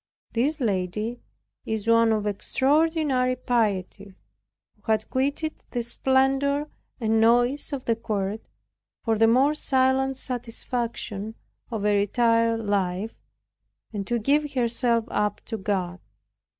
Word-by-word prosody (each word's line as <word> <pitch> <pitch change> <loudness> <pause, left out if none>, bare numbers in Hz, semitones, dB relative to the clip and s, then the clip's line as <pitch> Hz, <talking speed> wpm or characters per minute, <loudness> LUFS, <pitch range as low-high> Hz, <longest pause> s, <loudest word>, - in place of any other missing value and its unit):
This 285 +7 +1
lady 210 +1 -1 0.4
is 220 -1 -3
one 230 0 +5
of 215 -1 0
extraordinary 270 - +1
piety, 205 -5 -1 0.7
who 220 - -2
had 215 0 +1
quitted 285 +4 0 0.2
the 240 -2 -2
splendor 270 +4 +1 0.3
and 225 -1 +2
noise 245 +6 +3
of 275 -3 -4
the 230 - +2
Court, 215 -2 -3 0.6
for 225 -2 +1
the 225 - +6
more 260 +6 +4
silent 265 -2 +1
satisfaction 235 -4 -4 0.3
of 220 -4 -3
a 210 0 +3
retired 230 +2 +2
life, 200 0 -1 0.8
and 200 -2 -4
to 240 - +1
give 285 +6 +1
herself 235 -2 +1
up 210 -1 0
to 225 - -4
God. 185 -3 -2
230 Hz, 120 wpm, -25 LUFS, 210-265 Hz, 0.8 s, the